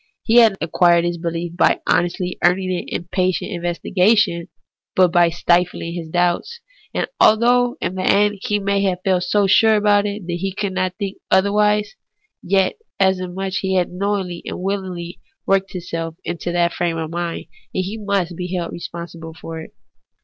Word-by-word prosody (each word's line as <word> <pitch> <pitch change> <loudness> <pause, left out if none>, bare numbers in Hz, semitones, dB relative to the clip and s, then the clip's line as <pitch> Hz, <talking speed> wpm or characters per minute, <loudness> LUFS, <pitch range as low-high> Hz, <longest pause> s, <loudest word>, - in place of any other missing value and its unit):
He 230 +1 +3
had 225 -5 +6
acquired 170 +1 +3
his 175 0 -2
behef 170 0 -3
not 170 - -14
by - - +3
honestly 180 +1 -1
earning 185 +1 +2
it 180 - -3
in - - -3
patient 185 -1 0
investigation, 180 +1 +1 0.5
but 185 -1 +5
by 175 0 +4
stifling 170 0 0
his 170 -2 -6
doubts. 175 - 0 0.3
And - - -1
although 245 +4 +4
in - - -2
the 185 - -4
end 205 +2 +2
he 210 - 0
may 200 0 0
have 185 -2 -1
felt 185 -2 +2
so 205 -1 +2
sure 220 +3 +5
about 205 -1 +3
it 205 -2 -5
that 175 0 -3
he 190 +1 -3
could 200 -2 -2
not 185 -1 -1
think 200 -2 -4
otherwise, 210 - +2 0.5
yet 190 0 +1 0.2
inasmuch 190 0 0
as 190 0 -2
he 190 -1 -1
had 180 -1 +1
knowingly 190 -2 -2
and - - -5
will 195 +2 -1
ingly 175 -2 -7 0.3
worked 195 0 +1
himself 165 -2 -5
into 175 0 -3
that 175 0 +1
frame 170 -2 -1
of 160 -1 -4
mind, 170 0 -3 0.3
he 185 +3 -3
must 200 -4 -1
be 180 +1 -4
held 170 -2 -3
responsible 170 -1 -8
for 165 0 -7
it. - - -11
185 Hz, 180 wpm, -20 LUFS, 175-200 Hz, 0.5 s, had